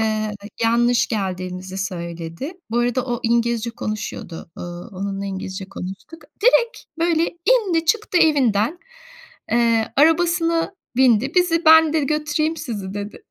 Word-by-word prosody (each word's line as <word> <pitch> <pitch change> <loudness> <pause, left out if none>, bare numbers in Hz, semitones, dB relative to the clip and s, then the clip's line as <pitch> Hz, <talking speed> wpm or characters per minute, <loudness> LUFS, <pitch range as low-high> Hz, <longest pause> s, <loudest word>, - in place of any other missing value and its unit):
Iıı, 215 -1 0 0.3
yanlış 240 +1 +3
geldiğimizi 185 -2 -4
söyledi. 170 - -5 0.2
Bu 235 - 0
arada 245 +1 +1
o 240 -1 -2
İngilizce 235 0 +1
konuşuyordu. 210 -7 -6
Iıı, 175 +4 -7
onunla 195 +1 -4
İngilizce 190 0 -5
konuştuk. 195 - -8 0.2
Direkt 480 0 +4 0.2
böyle 335 -1 +2 0.2
indi, 400 -10 +3
çıktı 420 0 +1
evinden, 275 - +2 0.7
eee, 230 -1 +2
arabasına 330 +3 +2 0.2
bindi. 255 +2 +3
Bizi, 355 -2 +2
"Ben," 320 -1 +7
dedi, 310 -3 +1
"götüreyim 305 +2 0
sizi." 205 -10 -5
dedi. 205 0 -7
235 Hz, 120 wpm, -21 LUFS, 200-320 Hz, 0.7 s, Ben